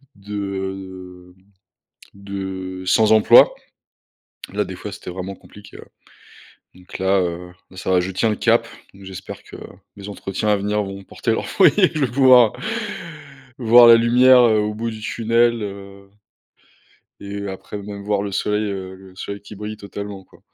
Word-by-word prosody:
de, 100 +1 -11
heu, 95 -2 -7 0.8
de 95 -2 -7
sans 110 +3 +3
emploi. 110 -1 +6 1.0
Là, - - -1
des - - -8
fois, - - -7
c'était - - -8
vraiment 95 +2 -6
compliqué, 105 0 -15
ouais - - -12 0.9
donc 90 0 -11
là, 95 +1 +2
heu, 90 0 -4 0.2
là, 95 - -15
ça 90 - -5
va. 90 - +4
Je 95 +2 -4
tiens 100 +5 0
le 105 - 0
cap - - +2 0.3
donc 95 0 -15
j'espère 95 0 -9
que - - -13 0.4
les 100 0 -9
entretiens 100 +1 -4
à 105 - +3
venir 105 +1 -1
vont 100 0 -8
porter - - -3
leurs - - -2
fruits. - - +5
Je 150 - +2
vais 120 - -6
pouvoir 125 -4 +6 1.1
voir 120 0 +7
la 115 - +9
lumière, 125 +2 +5
heu, 110 -3 +4
au 105 0 -1
bout 115 +2 -4
du 110 - -9
tunnel, 115 +1 +1
heu 100 -1 -9 1.1
et 100 - -9
heu, 100 - -4
après 95 +2 -8
même, 100 0 -8
voir 100 -1 0
le 100 - -4
soleil, 105 +2 -1
heu, 95 -1 -6
le 95 0 -16
soleil 100 +2 -7
qui 105 +1 -12
brille 105 +1 -6
totalement, 100 -1 -8
quoi. - - -22
100 Hz, 170 wpm, -20 LUFS, 95-110 Hz, 1.1 s, la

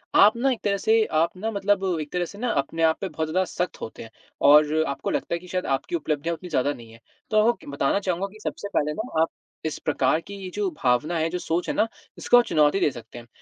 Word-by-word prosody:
आप 210 +3 +7
ना 270 +3 +2
एक 245 - -3
तरह 200 -1 +1
से 225 0 +5 0.2
आप 170 +2 -3
ना 220 +4 -2
मतलब 200 -1 +1 0.2
एक 150 - -7
तरह 180 -1 0
से 200 - -11
ना 245 +2 -2
अपने 165 +4 -4
आप 160 0 +4
पे 195 - -2
बहुत 160 0 -3
ज़्यादा 185 +4 +1
सख्त 180 0 -3
होते 110 - -7
हैं 115 - -12 0.3
और 150 +2 +6
आपको 140 - -3
लगता - - -2
है - - -4
कि 180 - -14
शायद 180 +1 -2
आपकी 135 - -5
उपलब्धियाँ 155 0 -1
उतनी 180 +2 -10
ज़्यादा 145 -1 +1
नहीं 115 -3 -13
हैं। 115 - -15 0.3
तो 215 - +2
आपको 225 +3 +5
कि - - -17
बताना 140 +6 0
चाहूँगा 190 0 -1
कि 215 - -14
सबसे 205 - -4
पहले 150 +1 +1
ना 220 -4 -2
आप 165 - +2 0.4
इस 155 - -2
प्रकार 150 0 +1
की 200 - -8
ये 185 - -5
जो 205 -2 0
भावना 135 +7 +2
है 160 0 0
जो 180 +2 -3
सोच 170 +1 -2
है - - 0
ना, 225 - +2 0.3
इसको 245 - +5
आप 245 - +6
चुनौती 150 +4 +3
दे 180 - +3
सकते 120 -1 -11
हैं। 120 - -14
170 Hz, 265 wpm, -25 LUFS, 150-200 Hz, 0.4 s, आप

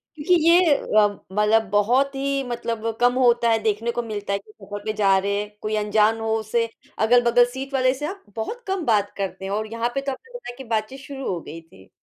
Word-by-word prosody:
क्योंकि 310 +4 +1 0.2
ये 345 -3 +6
अ, 210 -4 +3 0.2
मतलब 210 +2 +3
बहुत 245 +8 +2
ही 275 0 -1
मतलब 230 -2 -4 0.2
कम 245 0 +5
होता 240 -2 +4
है, 225 0 +3
देखने 220 +2 0
को 240 - -2
मिलता 205 -3 -4
है 200 - 0
कि 215 - -19
सफर 205 0 -9
पे 215 - -1
जा 195 -2 +3
रहे 200 +1 0
हैं, 210 0 -9
कोई 215 0 -2
अनजान 215 +1 +2
हो 225 0 -1
उसे 230 +2 0 0.3
अगल-बगल 240 +1 +5
सीट 270 +1 -6
वाले 255 -1 +3
से 295 +3 -5
आप 390 +2 -8
बहुत 465 - -5
कम 380 -4 -2
बात 205 -3 +2
करते 190 -1 -4
हैं 195 - -4
और 215 +1 -2
यहाँ 230 +1 -1
पे 275 - 0
तो 275 - -3
आपने 460 - -11
बताया 245 - -9
कि 265 - -8
बातचीत 225 +4 -2
शुरू 275 -1 -7
हो 180 - -2
गई 165 +1 -9
थी। 95 -13 -20
225 Hz, 230 wpm, -23 LUFS, 210-265 Hz, 0.3 s, ये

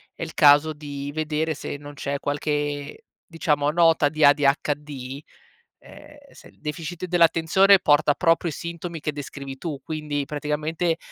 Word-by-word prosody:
è - - -6
il 160 - -7
caso 150 +1 +5
di 145 -1 -7
vedere 155 +1 -1
se 145 - -6
non 145 0 -11
c'è 140 0 -4
qualche, 145 - -3 0.2
diciamo, 150 -3 0
nota 165 -2 +3
di 155 0 +2
ADHD? 145 -1 +1 0.6
Ehm, 295 - -15
se - - -16
il - - -26
deficit 160 +3 -5
dell'attenzione 175 +3 +4
porta 145 -2 +3
proprio 165 +2 +1
i - - -6
sintomi 170 +1 -6
che 150 0 -3
descrivi 140 -1 -8
tu 150 -2 -5
quindi, 150 -1 -4
praticamente, 150 +3 -2
150 Hz, 145 wpm, -24 LUFS, 145-165 Hz, 0.6 s, caso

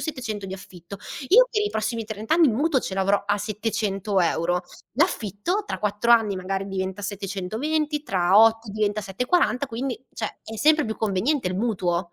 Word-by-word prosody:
700 225 -10 -4
di 190 - -5
affitto. 185 0 -11 0.3
Io - - +7
per 425 - 0
i 420 - +1
prossimi 220 - -2
30 220 +2 -4
anni 335 -2 +6
il 230 - +2
mutuo 280 +1 +2
ce 190 - -5
l'avrò 195 +1 +2
a 205 0 +2
700 205 -1 -2
euro, 175 +1 +1 0.3
l'affitto 310 - 0
tra - - -4
4 210 +3 -1
anni 220 -4 +5
magari 195 +1 -3
diventa 190 +1 -4
720, 220 +11 -2
tra 185 -5 +3
8 225 0 +4
diventa 210 0 0
740, 250 - +1
quindi 255 +1 -4
cioè 220 - -5
è 225 - -8
sempre 300 +2 +4
più 220 - -4
conveniente 220 +5 0
il 185 - -3
mutuo. 180 -6 -1
215 Hz, 175 wpm, -24 LUFS, 195-250 Hz, 0.3 s, Io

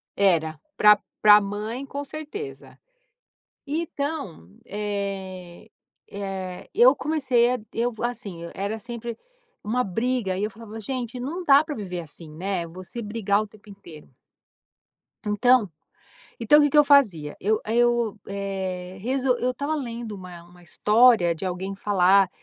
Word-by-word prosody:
Era, 160 -5 +2 0.2
para 210 -1 +7 0.2
para 210 0 +8
mãe 210 +6 -4
com 280 +1 -5
certeza. 310 +9 -8 0.9
Então, 285 - -4 0.2
eh 195 -2 -5 0.4
eh, 190 -2 -6
eu 255 +3 +6
comecei 260 -7 +2
a 250 - -2
eu 235 +1 0
assim, 230 -7 -4
era 200 +3 -3
sempre 235 +1 -6 0.5
uma 245 +4 0
briga 225 -1 -1
e 200 - -2
eu 210 - 0
falava: 225 +1 -10
"Gente, 245 +1 -4
não 315 +9 -4
dá 285 -2 +6
para 310 -2 -5
viver 185 -5 -5
assim, 160 0 -10
né", 180 +2 -3
você 185 +7 -8
brigar 210 -2 0
o 215 - -5
tempo 210 0 -19
inteiro. 170 -6 -13 1.2
Então 215 +2 +4 0.7
então 245 +6 +6
o - - +6
que 290 - +3
que 300 - +2
eu 295 - +9
fazia? 210 - +3
Eu, 215 +2 +1
eh 220 - -1
eu, 240 -3 +2
eh, 190 -2 -4
eu 255 0 +1
estava 285 +5 -2
lendo 235 -5 -5
uma 180 -3 -10
uma 175 +1 -19
história 210 0 +4
de 165 +4 -7
alguém 185 +2 -3
falar, 195 -1 +4
210 Hz, 140 wpm, -25 LUFS, 190-250 Hz, 1.2 s, eu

